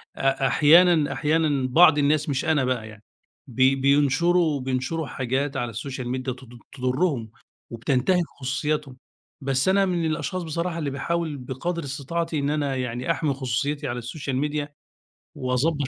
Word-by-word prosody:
أ 135 0 +1
أحيانًا 160 +1 +5
أحيانًا 150 -4 +1
بعض 160 +3 +6
الناس- 145 +1 +2
مش 140 +3 -1
أنا 155 -4 +2
بقى 125 -4 -2
يعني- 110 0 -14 0.4
بي 130 +2 +3
بينشروا 145 +4 +2
بينشروا 130 +5 -2
حاجات 135 +3 -2
على 120 -3 -3
الSocial 130 +1 -5
Media 130 - -5
تض 125 -2 -7
تُضرهم 130 -3 -1 0.4
وبتنتهِك 135 +10 +1 0.2
خصوصياتهم، 140 0 -2 0.5
بس 135 +3 0
أنا 195 +1 +4
من 175 -3 -1
الأشخاص 175 +4 -2
بصراحة 170 +1 -3
اللي 150 -3 -2
باحاول 155 +2 -2
بقدر 150 +7 -4
استطاعتي 150 +4 -3
إن 140 0 -1
أنا 145 -3 -1
يعني 125 +2 -2
أحمي 155 -3 0
خصوصيتي 140 +3 -2
على 120 0 -3
الSocial 135 +2 -5
Media 150 -1 -2 0.7
وأضبّط 130 +3 0
140 Hz, 145 wpm, -24 LUFS, 130-160 Hz, 0.7 s, بعض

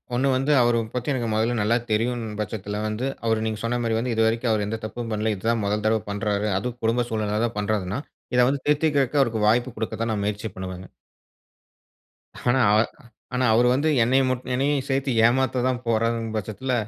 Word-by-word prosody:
ஒண்ணு 130 +3 +2
வந்து, 135 +3 +1
அவர 120 -1 +3
பத்தி 125 +3 -2
எனக்கு 120 -3 -2
மொதல்ல 115 +2 +1
நல்லா 105 +3 +2 0.2
தெரியுன்னு 115 -1 -1
பச்சத்தில 105 -1 -4
வந்து, 110 +5 -3 0.2
அவரு 110 -1 +1
நீங்க 110 -1 -2
சொன்னா 120 +1 0
மாரி 110 -1 0
வந்து 125 0 -1
இதுவரைக்கும் 115 +1 +2
அவர் 105 -2 +1
எந்த 110 +1 -3
தப்பும் 115 +1 -5
பண்ல. 110 0 0
இது 95 - -12
தான் 115 -2 +1
மொதல் 105 +1 -1
தடவை 110 0 +2
பண்றாரு. 105 0 -1
அதும் 120 +4 -4
குடும்ப 120 +2 +2
சூழ்நிலைனாலதான் 110 +1 -1
பண்றாருன்னா, 100 +1 -1 0.4
இத - - +4
வந்து 140 -1 -2
திருத்திக்குறதுக்கு, 145 -2 +2
அவருக்கு 110 -4 +1
வாய்ப்பு 120 +2 +2
குடுக்க 110 0 -3
தான், 115 - -1
நான் 100 -2 -2
முயற்சி 105 +1 -3
பண்ணுவேங்க. 95 -1 -7 1.6
ஆனா, 130 +2 +3 0.2
அ - - +3 0.5
ஆனா, 125 0 +1
அவரு 120 +2 +4
வந்து 145 +4 +1
என்னைய 130 +3 +3
முட் 130 0 -2
என்னையயும் 140 +1 +1
சேத்து 135 0 0 0.2
ஏமாத்த 130 0 +1
தான் 125 -1 -1
போறாருங்கும் 115 0 0
பச்சத்தில, 110 +5 -3
115 Hz, 185 wpm, -24 LUFS, 110-125 Hz, 1.6 s, இத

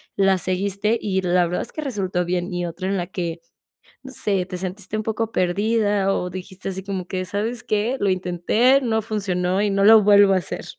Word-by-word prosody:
la 195 -1 +3
seguiste, 200 +4 -1
y 190 -2 -1
la 180 0 +2
verdad 175 - -2
es - - -10
que 310 - -5
resultó 195 -9 -2
bien. 180 +1 -2
Y 175 0 -2
otra 175 +3 -5
en 195 - 0
la 175 -2 -2
que, 170 -3 -4 0.6
no 265 - -9
sé, 200 -6 -1
te 180 0 -6
sentiste 190 +3 -5
un 215 - -2
poco 225 0 -2
perdida, 205 +1 +1
o 180 - -2
dijiste 185 +1 -7
así 190 0 -5
como 190 -2 -4
que: 185 0 -3
"¿Sabes 215 +5 -3
qué? 215 +4 0
Lo 200 - +1
intenté, 185 +9 +2
no 220 -3 0
funcionó 190 -3 -1
y 210 - +1
no 195 0 +1
lo 220 -1 +8
vuelvo 200 -1 +6
a - - +3
hacer". 175 - -4
195 Hz, 210 wpm, -22 LUFS, 180-210 Hz, 0.6 s, lo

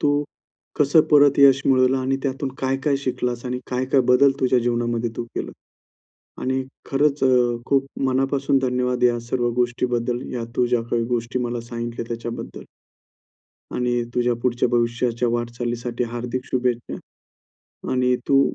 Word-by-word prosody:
तू, 145 - +2 0.7
कसं 150 +2 +5
परत 145 -2 +5
यश 140 -1 +6
मिळवलं 130 0 +4
आणि 130 +1 0
त्यातून 135 0 -2
काय-काय 135 +2 0
शिकलास 125 -1 -2
आणि 125 0 -2
काय-काय 130 +2 +2
बदल 140 +2 +5
तुझ्या 130 -1 +3
जीवनामध्ये 120 -1 -1
तू 120 - -3
केलं - - -4 0.9
आणि 130 +1 0 0.3
खरंच 145 +1 +1
अ, 125 -2 +3
खूप 135 -1 +2 0.2
मनापासून 135 +1 +1
धन्यवाद 125 -1 -1
या 120 -1 +3
सर्व 120 -1 +1
गोष्टीबद्दल 120 0 -1
या 120 -2 -3
तू 125 - +3
ज्या 120 -1 +1
काही 115 -1 +1
गोष्टी 120 +2 -2
मला 120 0 -3
सांगितल्या 120 0 -5
त्याच्याबद्दल. 115 0 -6 1.1
आणि 120 -1 0
तुझ्या 120 0 +2
पुढच्या 120 -1 +1
भविष्याच्या 120 0 0
वाटचालीसाठी 120 0 -3
हार्दिक 125 +1 -4
शुभेच्छा 125 -2 -2 1.0
आणि 125 -1 +2
तू 135 0 +5
125 Hz, 135 wpm, -22 LUFS, 120-130 Hz, 1.1 s, यश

